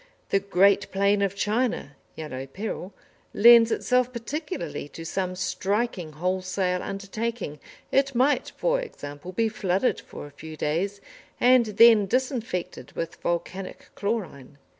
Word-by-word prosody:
The 195 Hz, -, +3 dB
great 195 Hz, +1 st, +3 dB
plain 200 Hz, +1 st, +2 dB
of 200 Hz, -1 st, 0 dB
China 210 Hz, -, -1 dB, 0.2 s
("Yellow 135 Hz, -4 st, -6 dB
Peril") 195 Hz, +3 st, -5 dB, 0.4 s
lends 235 Hz, +1 st, +8 dB
itself 250 Hz, 0 st, +1 dB
particularly 235 Hz, -, -5 dB
to 165 Hz, -, -9 dB
some 185 Hz, +1 st, -2 dB
striking 190 Hz, -2 st, -2 dB
wholesale 185 Hz, +2 st, -1 dB
undertaking; 200 Hz, -4 st, -4 dB, 0.3 s
it 275 Hz, -1 st, +2 dB
might, 265 Hz, +4 st, +2 dB
for -, -, +1 dB
example, 145 Hz, -, -8 dB
be 225 Hz, +5 st, +1 dB
flooded 195 Hz, +1 st, 0 dB
for -, -, -10 dB
a 145 Hz, -, -12 dB
few 155 Hz, +2 st, -10 dB
days, 185 Hz, +8 st, -1 dB, 0.4 s
and 250 Hz, -2 st, +5 dB
then 225 Hz, -3 st, +7 dB
disinfected 245 Hz, -5 st, -2 dB
with 165 Hz, 0 st, -4 dB
volcanic 185 Hz, +2 st, -4 dB
chlorine. 185 Hz, -, -4 dB
195 Hz, 125 wpm, -26 LUFS, 175-235 Hz, 0.4 s, lends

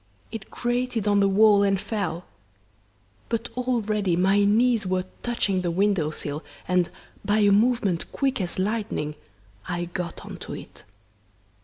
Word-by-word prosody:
It 220 Hz, -3 st, -7 dB
grated 240 Hz, -3 st, -1 dB
on 205 Hz, -1 st, +4 dB
the 200 Hz, -, +4 dB
wall 205 Hz, +1 st, +6 dB
and 195 Hz, -1 st, +2 dB
fell. 180 Hz, -6 st, -3 dB, 1.0 s
But, 230 Hz, 0 st, -2 dB
already, 215 Hz, -7 st, 0 dB
my 190 Hz, +3 st, +3 dB
knees 225 Hz, 0 st, +3 dB
were 185 Hz, 0 st, 0 dB, 0.2 s
touching 210 Hz, -6 st, 0 dB
the 175 Hz, -, -1 dB
window 185 Hz, -3 st, +2 dB
sill, 150 Hz, 0 st, -4 dB, 0.2 s
and, 180 Hz, -1 st, +2 dB, 0.3 s
by 205 Hz, +1 st, +2 dB
a 205 Hz, -1 st, +5 dB
movement 210 Hz, -4 st, +2 dB
quick 270 Hz, -5 st, 0 dB
as 175 Hz, -2 st, -3 dB
lightning, 205 Hz, -6 st, -1 dB, 0.5 s
I 175 Hz, 0 st, -2 dB
got 175 Hz, 0 st, -5 dB
on -, -, -8 dB
to -, -, -7 dB
it. -, -, -11 dB
200 Hz, 145 wpm, -25 LUFS, 180-225 Hz, 1.0 s, wall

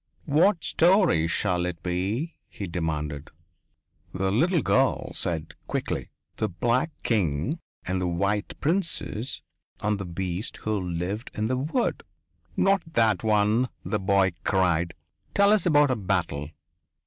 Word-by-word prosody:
"What 165 Hz, +4 st, +3 dB
story 175 Hz, -, +4 dB
shall 90 Hz, 0 st, 0 dB
it 85 Hz, -2 st, -6 dB
be?" 100 Hz, -, -2 dB
he 100 Hz, -, -6 dB
demanded. 75 Hz, -4 st, -3 dB, 0.9 s
The 95 Hz, 0 st, 0 dB
little 165 Hz, -, +2 dB
girl 135 Hz, 0 st, +2 dB
said 80 Hz, -2 st, -2 dB
quickly: -, -, -2 dB, 0.3 s
"The 110 Hz, -, 0 dB
black 120 Hz, -, +1 dB
king 105 Hz, -, 0 dB, 0.3 s
and 95 Hz, 0 st, -1 dB
the 90 Hz, -, 0 dB
white 100 Hz, +4 st, -1 dB
princess 150 Hz, -, -1 dB, 0.4 s
and 105 Hz, -1 st, 0 dB
the 100 Hz, -, -4 dB
beast 90 Hz, +3 st, -3 dB
who 110 Hz, 0 st, -2 dB
lived 90 Hz, +6 st, -3 dB
in 110 Hz, -, -1 dB
the 125 Hz, +3 st, 0 dB
wood." 160 Hz, -, 0 dB, 0.6 s
"Not 195 Hz, 0 st, +4 dB
that 110 Hz, -4 st, +3 dB
one," 110 Hz, +3 st, +3 dB, 0.2 s
the 105 Hz, -, -1 dB
boy 95 Hz, -1 st, +3 dB
cried. 85 Hz, -3 st, +1 dB, 0.4 s
"Tell 200 Hz, 0 st, +5 dB
us 210 Hz, -3 st, +2 dB
about 145 Hz, -4 st, +5 dB
a -, -, +2 dB
battle." 90 Hz, -8 st, -1 dB
105 Hz, 135 wpm, -26 LUFS, 90-135 Hz, 0.9 s, Tell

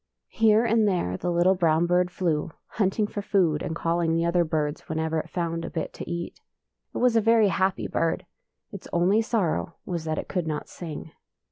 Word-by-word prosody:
Here 220 Hz, 0 st, +4 dB
and 225 Hz, -1 st, +3 dB
there 175 Hz, -, 0 dB
the 175 Hz, -, -3 dB
little 175 Hz, +2 st, +4 dB
brown 165 Hz, -2 st, +2 dB
bird 180 Hz, +1 st, +2 dB
flew, 170 Hz, -4 st, -1 dB, 0.2 s
hunting 210 Hz, 0 st, 0 dB
for 205 Hz, 0 st, -5 dB
food 180 Hz, -7 st, +1 dB
and 160 Hz, -, -3 dB
calling 165 Hz, -1 st, 0 dB
the 165 Hz, 0 st, +1 dB
other 170 Hz, 0 st, +3 dB
birds 155 Hz, -1 st, -2 dB
whenever 160 Hz, 0 st, -1 dB
it -, -, -6 dB
found 165 Hz, -1 st, -2 dB
a -, -, -4 dB
bit 160 Hz, -, -4 dB
to -, -, -8 dB
eat. 170 Hz, 0 st, -5 dB, 0.5 s
It -, -, -1 dB
was 245 Hz, -1 st, +3 dB
a 225 Hz, -, +5 dB
very 225 Hz, -1 st, +4 dB
happy 190 Hz, 0 st, 0 dB
bird. 165 Hz, -1 st, -1 dB, 0.5 s
Its 200 Hz, -4 st, -9 dB
only 185 Hz, +6 st, +3 dB
sorrow 185 Hz, -6 st, -1 dB
was 170 Hz, -3 st, -4 dB
that 155 Hz, -1 st, -2 dB
it -, -, -4 dB
could 180 Hz, -4 st, -2 dB
not 150 Hz, -1 st, -3 dB
sing. 160 Hz, -2 st, -8 dB
175 Hz, 200 wpm, -26 LUFS, 160-200 Hz, 0.5 s, a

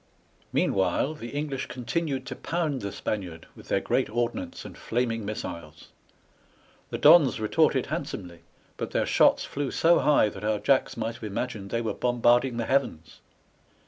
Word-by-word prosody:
Meanwhile, 95 Hz, -, +1 dB
the 130 Hz, -6 st, -9 dB
EngKsh 145 Hz, -2 st, -3 dB
continued 135 Hz, +2 st, -3 dB
to -, -, -6 dB
pound 160 Hz, -5 st, -2 dB
the 100 Hz, -1 st, -4 dB
Spaniard 90 Hz, -7 st, -5 dB
with -, -, -14 dB
their -, -, +1 dB
great -, -, 0 dB
ordnance 120 Hz, -, -3 dB
and -, -, -9 dB
flaming 115 Hz, -1 st, -2 dB
missiles. 85 Hz, -6 st, -7 dB, 1.0 s
The -, -, -3 dB
Dons 150 Hz, -6 st, +6 dB
retorted 110 Hz, -1 st, +2 dB
handsomely, 85 Hz, -2 st, -5 dB, 0.4 s
but -, -, -4 dB
their -, -, 0 dB
shots -, -, +4 dB
flew 140 Hz, -1 st, -3 dB
so 170 Hz, +5 st, +4 dB
high 145 Hz, -8 st, +4 dB
that 100 Hz, 0 st, -10 dB
our 105 Hz, 0 st, +1 dB
Jacks 135 Hz, +3 st, +1 dB
might 115 Hz, 0 st, -2 dB
have 115 Hz, -, -14 dB
imagined 105 Hz, -1 st, -4 dB
they 115 Hz, -, -1 dB
were 115 Hz, -, -2 dB
bombarding 120 Hz, 0 st, +2 dB
the 115 Hz, -, -1 dB
heavens. 85 Hz, -, -1 dB
120 Hz, 155 wpm, -27 LUFS, 105-140 Hz, 1.0 s, Dons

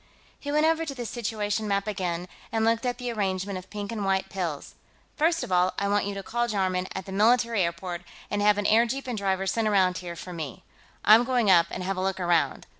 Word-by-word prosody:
He 285 Hz, -, -5 dB
went 300 Hz, +1 st, +3 dB
over 325 Hz, 0 st, +2 dB
to 285 Hz, -4 st, -5 dB
the 245 Hz, -2 st, -5 dB
situation 215 Hz, -2 st, -2 dB
map 200 Hz, -1 st, 0 dB
again, 180 Hz, -4 st, -3 dB, 0.2 s
and 225 Hz, 0 st, +1 dB
looked 230 Hz, +2 st, +1 dB
at 245 Hz, -, -1 dB
the 245 Hz, -1 st, -3 dB
arrangement 195 Hz, -2 st, -2 dB
of 185 Hz, -, -15 dB
pink 205 Hz, 0 st, -5 dB
and 215 Hz, -3 st, -3 dB
white 195 Hz, 0 st, 0 dB
pills. 175 Hz, -7 st, -4 dB, 0.4 s
"First 330 Hz, +2 st, +2 dB
of -, -, -6 dB
all, 180 Hz, +1 st, +3 dB
I 200 Hz, -, 0 dB
want 205 Hz, 0 st, +1 dB
you 200 Hz, 0 st, -3 dB
to 195 Hz, -, -5 dB
call 240 Hz, +4 st, -1 dB
Jarman, 185 Hz, -4 st, 0 dB
at 190 Hz, -, -4 dB
the 195 Hz, -, -8 dB
military 230 Hz, +2 st, +3 dB
airport, 175 Hz, 0 st, -2 dB, 0.3 s
and 205 Hz, -, 0 dB
have 205 Hz, 0 st, +4 dB
an 205 Hz, -, -1 dB
airjeep 235 Hz, +6 st, +2 dB
and 250 Hz, -2 st, -3 dB
driver 195 Hz, -2 st, -1 dB
sent 220 Hz, +3 st, 0 dB
around 190 Hz, -3 st, +3 dB
here 175 Hz, -1 st, -7 dB
for 180 Hz, +2 st, -8 dB
me. 155 Hz, -7 st, -6 dB, 0.4 s
I'm 220 Hz, +3 st, +8 dB
going 245 Hz, -5 st, +2 dB
up 170 Hz, -2 st, +6 dB
and 185 Hz, -, -5 dB
have 195 Hz, +1 st, -2 dB
a -, -, -1 dB
look 190 Hz, 0 st, -1 dB
around. 175 Hz, -2 st, +1 dB
200 Hz, 235 wpm, -26 LUFS, 185-230 Hz, 0.4 s, I'm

